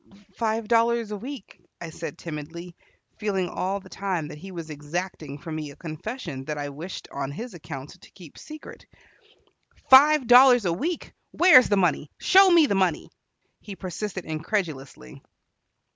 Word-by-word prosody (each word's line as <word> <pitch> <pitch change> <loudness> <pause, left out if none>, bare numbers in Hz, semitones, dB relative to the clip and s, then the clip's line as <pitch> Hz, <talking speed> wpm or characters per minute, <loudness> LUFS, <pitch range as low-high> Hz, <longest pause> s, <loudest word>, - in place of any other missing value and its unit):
"Five 225 -1 -2
dollars 230 -1 +2
a - - -3
week," 250 +2 -9 0.2
I 170 -2 -7
said 160 -2 -7
timidly, 170 +2 -8 0.4
feeling 195 -4 -1
all 190 +3 -3
the 190 - -16
time 185 -6 -3
that 150 - -10
he 190 +4 -10
was 165 -3 -7
exacting 150 0 -5
from 165 +1 -8
me 155 -2 -5
a 140 - -12
confession 165 - -7
that 150 0 -4
I 145 0 -4
wished, 155 +7 -8
on 140 -1 -4
his 230 - -7
account, 155 -1 -9
to - - -16
keep 170 -6 -15
secret. 310 -1 -12 1.0
"Five 290 +1 +7
dollars 245 -1 +7
a 170 - +1
week! 325 - -4 0.2
Where 355 -7 +7
is 255 - -1
the 205 - +2
money? 170 -5 +1
Show 385 +1 +6
me 340 -3 +6
the 240 - 0
money!" 185 -5 0 0.5
he 200 - -9
persisted 190 +1 -6
incredulously. 155 - -4
185 Hz, 160 wpm, -25 LUFS, 155-230 Hz, 1.0 s, Five